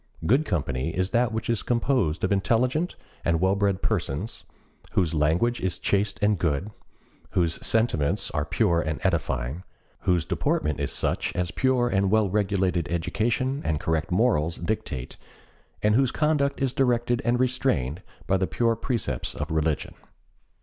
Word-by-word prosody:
Good 130 - +3
company 70 -6 -1
is 95 +1 0
that 120 0 +2
which 110 0 -3
is 115 -4 0
composed 115 - 0
of 95 - +1
intelligent 125 - +1 0.3
and 85 -1 +2
well 95 +2 +3
bred 100 -1 0
persons, 105 - -2 0.5
whose 85 -3 +1
language 80 +11 +1
is 95 -2 -1
chaste 100 0 0
and 105 -3 +3
good, 85 +5 -1 0.6
whose 85 -2 0
sentiments 100 -5 +1
are 75 0 0
pure 85 +1 +1
and 80 -1 -3
edifying, 75 -5 -1 0.4
whose 90 -3 +1
deportment 75 -1 0
is - - -2
such - - -1
as 90 -1 -1
pure 130 +1 +2
and 100 -4 +1
well 105 -2 +2
regulated 95 -6 0
education 120 - 0
and 75 -2 0
correct 80 -2 -1
morals 90 -5 +2
dictate, 85 - -4 0.7
and 105 0 +4
whose 130 +2 +3
conduct 145 -1 +1
is 135 -2 0
directed 120 -2 +1
and 120 0 +1
restrained 120 - 0 0.2
by 95 - +2
the 95 0 0
pure 115 +6 +1
precepts 115 -1 -2
of - - -4
religion. 80 -1 0
95 Hz, 150 wpm, -26 LUFS, 80-120 Hz, 0.7 s, and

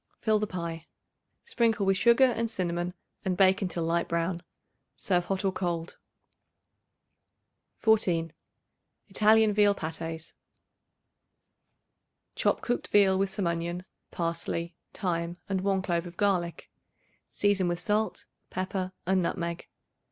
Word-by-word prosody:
Fill 215 -1 +2
the 215 - -1
pie. 170 -3 -5 0.6
Sprinkle 230 - +1
with 195 0 +3
sugar 235 +6 +5
and 230 -3 +2
cinnamon 175 -3 -2 0.3
and 185 -2 -1
bake 190 +1 +5
until 175 -3 -2
light 170 +1 0
brown. 170 +1 -1 0.6
Serve 175 -2 +1
hot 195 +1 -2
or 190 - +3
cold. 175 -3 -3 1.8
14. 175 -8 +2 0.8
Italian 215 0 +4
Veal 205 -1 +4
Patés. 165 -1 -5 2.0
Chop - - +1
cooked 245 - -2
veal 195 -2 +5
with 195 0 +1
some 190 0 -2
onion, 170 +1 -2 0.2
parsley, 170 0 -3 0.2
thyme 170 -3 -2
and 190 -2 -1
1 195 -1 +1
clove 175 -1 -1
of 175 - -12
garlic; 180 -5 0 0.6
season 200 -3 +2
with 175 0 -1
salt, 215 +3 -1 0.2
pepper 185 0 -3
and 190 +1 +2
nutmeg. 170 -1 -3
185 Hz, 120 wpm, -28 LUFS, 170-205 Hz, 2.0 s, sugar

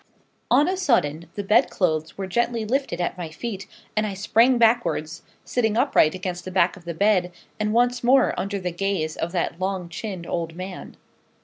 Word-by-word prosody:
On 295 - +5
a 375 +1 0
sudden 170 - +1
the 205 - -3
bed 205 +2 +4
clothes 160 -4 -1
were 195 - -3
gently 235 +3 0
lifted 270 -5 -1
at 180 +1 -2
my 170 -2 -4
feet, 200 +4 -6 0.3
and 215 0 +1
I 200 - -4
sprang 230 +6 +3
backwards, 195 -9 +1 0.2
sitting 225 -3 0
upright 235 - +3
against 180 -1 -4
the 185 - -6
back 180 -1 +2
of 185 -3 -15
the 170 -1 -5
bed, 185 -1 +2 0.3
and 210 0 0
once 245 +2 +2
more 260 +2 +4
under 200 +1 -3
the 180 -1 -3
gaze 175 -3 -2
of 165 - -3
that 170 -1 -2
long 185 -2 -2
chinned 180 0 -6
old 165 -1 -3
man. 185 +1 -8
195 Hz, 190 wpm, -24 LUFS, 170-230 Hz, 0.3 s, On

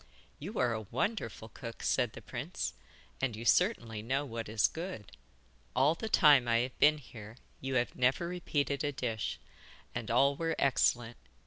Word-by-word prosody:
'You 195 +9 -6
are 120 - +2
a 110 - -3
wonderful 115 - -2
cook,' 115 0 -8
said - - +1
the - - -10
prince, - - -4 0.5
'and 130 -4 0
you 115 +2 -7
certainly 120 - +2
know 135 +6 -1
what 115 -4 -5
is 105 -3 +3
good. 165 - -7 0.6
All 135 +5 +4
the 220 +6 -5
time 145 - +6
I 115 0 +4
have 125 +1 -5
been 155 +1 +6
here 115 -5 -11 0.2
you 135 0 -3
have 120 -1 +1
never 130 +7 +2
repeated 145 -5 -1
a 145 - 0
dish, 115 -6 -3 0.5
and 120 -2 -4
all 135 +4 +4
were 165 +2 -1
excellent. 120 -3 +2
130 Hz, 165 wpm, -32 LUFS, 115-150 Hz, 0.6 s, time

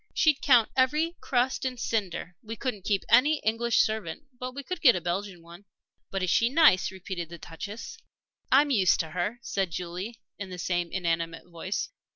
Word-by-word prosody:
She'd 310 -3 +3
count 245 -5 +5
every 300 +6 +2
crust 250 0 0
and 255 -2 -3
cinder. 190 -6 -2
We 225 +1 -7
couldn't 220 -5 -4
keep 200 -2 +1
any 270 +7 +5
English 230 +1 +2
servant; 215 - -2 0.2
but 255 0 -5
we 280 - -5
could 360 +4 -5
get 245 -6 +7
a - - 0
Belgian 180 0 -4
one." 170 +4 -14 0.4
"But 195 -1 -2
is 180 - +1
she 230 - +3
nice?" 285 - +5
repeated 185 -3 -6
the 170 - -9
Duchess. 200 +8 -8 0.5
"I'm 285 +2 +5
used 195 -8 +4
to 160 -1 -7
her," 180 +7 -2
said 195 -5 -1
Julie, 180 +6 -5 0.2
in 200 -2 -5
the 180 - -7
same 175 -1 -1
inanimate 165 -2 -2
voice. 175 +4 -4
205 Hz, 185 wpm, -28 LUFS, 175-250 Hz, 0.5 s, get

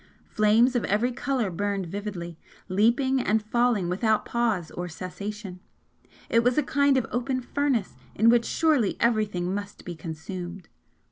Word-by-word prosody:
Flames 220 +4 +3
of 240 - +1
every 220 +6 +1
colour 255 -5 -1
burned 200 +1 -2
vividly, 175 -2 -5 0.3
leaping 240 +7 +2
and 220 -2 +2
falling 235 -4 +1
without 215 +5 +1
pause 220 -9 -1
or 175 0 -5
cessation, 190 +2 -7 0.7
it 230 0 +3
was 245 +1 +2
a 300 - +4
kind 280 0 +3
of 255 - +1
open 255 +2 -1
furnace 255 -4 -1 0.2
in 220 - +3
which 235 0 +4
surely 300 -11 +2
everything 210 -6 +1
must 205 0 -6
be 175 - -5
consumed! 175 +3 -7
215 Hz, 145 wpm, -26 LUFS, 185-245 Hz, 0.7 s, a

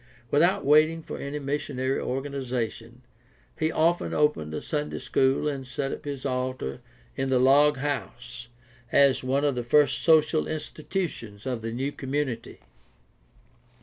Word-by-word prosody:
Without 170 +6 +3
waiting 155 +3 +4
for - - -7
any 140 +1 -4
missionary 135 -2 -2
organization 125 -3 -4 0.6
he 160 0 +1
often 170 +3 +1
opened 150 - +1
a 80 - -3
Sunday 150 -1 -3
school 130 +3 +1
and 135 -3 -3
set 135 +1 -3
up - - -7
his 140 -2 -5
altar 130 - -3 0.3
in 135 0 -1
the 130 - +3
log 140 +3 +5
house 125 -4 -5 0.4
as 140 -2 +4
one 135 +3 +1
of 145 - +2
the 125 - -2
first 145 +5 +3
social 155 -1 +4
institutions 155 - -4
of 125 -3 -2
the 115 0 -4
new 135 +5 -2
community. 135 -4 -4
135 Hz, 140 wpm, -26 LUFS, 125-150 Hz, 0.6 s, log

